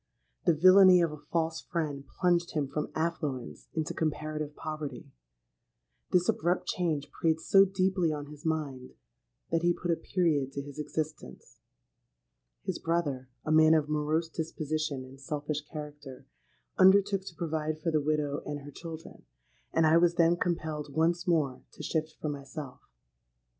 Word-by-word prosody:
The 170 - +5
villany 185 +2 +8
of 165 - +1
a 150 -1 -11
false 165 -1 0
friend 150 -5 -3
plunged 175 -1 +1
him 145 -3 +1
from 150 +2 -3
affluence 150 - -3
into 160 -2 -1
comparative 155 -1 -3
poverty. 155 -5 -6 1.0
This 180 -1 +3
abrupt 175 +3 +1
change 160 -5 -1
preyed 160 -1 +1
so 195 +4 +6
deeply 185 -3 +1
on 145 -1 -4
his 150 +1 -12
mind, 145 -6 -3 0.6
that 165 0 +2
he 175 0 +3
put 175 - -1
a - - +3
period 155 -7 0
to 140 - -4
his 145 +1 -10
existence. 150 - -5 1.0
His - - -3
brother—a 145 -5 -2
man 155 0 +6
of 150 -1 +1
morose 150 +2 0
disposition 155 -4 -3
and 135 +1 -14
selfish 150 0 -3
character—undertook 155 +7 0
to 175 - -9
provide 155 -2 -2
for 165 +1 -1
the 155 -1 +2
widow 150 -1 0
and 145 -1 -5
her 145 +1 -10
children; 160 - -9 0.5
and 165 0 +3
I 155 +1 +6
was 170 0 +4
then 170 -1 +4
compelled 155 -4 -2
once 170 +2 +1
more 150 -7 +1
to - - -9
shift 155 -1 -2
for 155 - -2
myself. 140 -1 -7
155 Hz, 145 wpm, -30 LUFS, 145-170 Hz, 1.0 s, villany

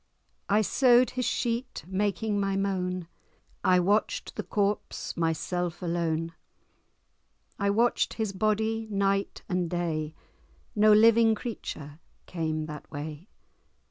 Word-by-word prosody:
I 210 +2 +4
sew'd 250 +2 +4
his 250 -1 -2
sheet, 240 +1 -2
making 205 +2 -1
my 195 -1 0
moan; 185 -3 -1 0.6
I 180 -1 +5
watch'd 205 +4 0
the - - -2
corpse, 205 0 -2
myself 170 +1 -1
alone; 165 -1 -1 1.3
I 200 -1 +1
watch'd 230 +4 +2
his 220 -3 -2
body, 220 +2 0
night 195 -1 0
and 180 -3 -1
day; 160 -3 -2 0.6
No 215 0 +5
living 225 +1 +6
creature 155 - -7 0.3
came 155 -2 -2
that 150 -1 -9
way. 150 +4 -7
195 Hz, 110 wpm, -28 LUFS, 170-215 Hz, 1.3 s, living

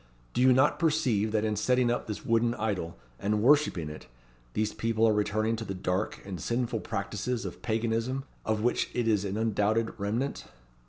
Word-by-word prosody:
Do - - +1
you 130 0 +6
not 130 +3 +4
perceive 140 - +2
that 110 0 +1
in 110 -1 0
setting 125 +3 +2
up 120 - -2
this 105 - -5
wooden 115 +1 +2
idol, 100 -6 -2 0.2
and 105 +1 0
worshipping 140 - +4
it, 75 0 -9 0.5
these 110 0 0
people 115 0 +1
are 110 - +4
returning 110 +2 +1
to 115 - -4
the 100 -3 -5
dark 90 +2 -2
and 95 -4 -6
sinful 120 -1 -1
practices 105 +4 -3
of - - -7
Paganism 115 +3 -1 0.2
of 110 -1 -1
which 120 - +1
it 120 -2 0
is 105 -3 +2
an 100 +1 -2
undoubted 110 0 +1
remnant? 115 +8 -2
110 Hz, 180 wpm, -29 LUFS, 105-120 Hz, 0.5 s, you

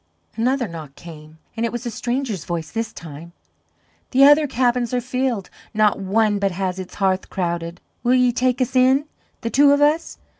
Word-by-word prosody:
Another 245 +2 0
knock 155 -5 -9
came, 155 -2 -12 0.2
and 230 - -2
it 235 - 0
was 240 +1 -5
a 240 - -3
stranger's 240 - -3
voice 165 -3 -4
this 225 0 -3
time: 165 -2 -11 0.8
"The 270 +1 +4
other 295 +2 +6
cabins 245 -1 0
are - - +2
filled; 250 -4 -2 0.2
not 210 -2 +3
one 205 +2 +1
but 200 0 +1
has 185 0 -3
its 185 - -8
hearth 190 -1 0
crowded; 170 -1 -3 0.2
will 250 +1 +3
ye 250 -1 +4
take 250 +1 0
us 255 +1 -1
in 260 +3 +4 0.4
the 230 - -3
two 285 +1 +5
of 285 - +4
us? 300 +3 +1
230 Hz, 185 wpm, -21 LUFS, 185-255 Hz, 0.8 s, other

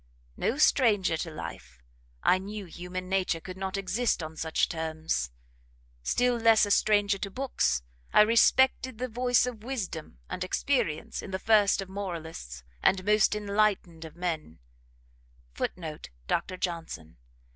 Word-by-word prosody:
No 245 - -1
stranger 210 - +4
to 165 - -4
life, 155 - -8 0.5
I 185 - +4
knew 205 +1 -6
human 180 +2 -6
nature 185 -3 0
could 185 +2 -8
not 190 +1 -3
exist 195 0 0
on 155 0 -7
such 160 0 0
terms; 160 - -2 0.7
still 245 - +1
less 225 -2 +5
a 205 - -3
stranger 205 -1 +3
to 195 - -3
books, 250 - 0 0.3
I - - +7
respected 235 +2 +4
the 255 +2 -2
voice 245 0 +2
of 235 -4 -6
wisdom 190 - -5
and 180 - -4
experience 185 - -1
in - - -8
the 190 - -2
first 205 -1 +3
of - - -13
moralists, 165 - -6 0.2
and 190 -1 +2
most 210 0 +4
enlightened 200 -5 0
of 160 0 -10
men, 165 - -3 1.0
[Footnote: 155 - -5 0.2
Dr 185 +2 -1
Johnson. 165 - -5
190 Hz, 140 wpm, -28 LUFS, 165-215 Hz, 1.0 s, I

